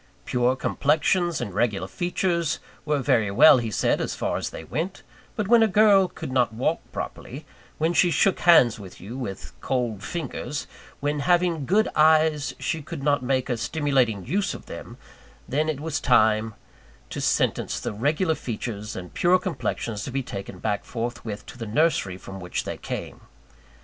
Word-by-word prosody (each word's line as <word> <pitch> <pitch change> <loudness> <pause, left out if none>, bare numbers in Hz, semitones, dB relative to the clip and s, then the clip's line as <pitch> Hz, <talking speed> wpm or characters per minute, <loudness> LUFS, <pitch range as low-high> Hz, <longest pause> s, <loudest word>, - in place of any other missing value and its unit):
Pure 125 +1 +1
complexions 160 +5 +1
and 105 -6 -4
regular 100 -3 0
features 175 - -1 0.3
were 150 -1 +1
very 110 -3 +2
well, 135 +7 +7
he 115 -2 -3
said, 105 - +1
as - - -2
far - - -2
as - - -2
they - - -8
went; 165 - -4 0.3
but 210 -3 -2
when 235 +1 +6
a 225 - +5
girl 200 -2 +5
could 160 - -7
not 125 -3 +2
walk 125 +9 0
properly, - - -6 0.3
when 160 +2 +1
she 175 - +4
shook 190 +3 +2
hands 125 -11 +5
with 95 -3 -11
you 105 +7 -8
with 95 - -6
cold 120 -6 -1
fingers, 150 0 -4 0.4
when 145 +1 -1
having 170 -2 +1
good 215 +5 +3
eyes 155 -1 +3
she 160 -1 -2
could 140 - -7
not 145 -1 +2
make 130 0 0
a 125 - 0
stimulating 130 - 0
use 200 +2 -1
of - - -11
them, - - -9 0.5
then 155 +4 0
it 150 -3 -2
was 155 0 -2
time 110 -3 +3 0.6
to - - -4
sentence - - 0
the - - -4
regular 155 - +1
features 110 -5 -5
and 90 -1 -8
pure 180 +1 +4
complexions 130 - -3
to - - -5
be 135 +1 -2
taken 100 -4 -7
back 105 +2 -2
forthwith 115 -3 -5
to 125 - -12
the 115 - -5
nursery 115 - +1
from 95 0 -9
which 90 -1 -3
they - - -4
came. - - -6
135 Hz, 175 wpm, -25 LUFS, 110-160 Hz, 0.6 s, well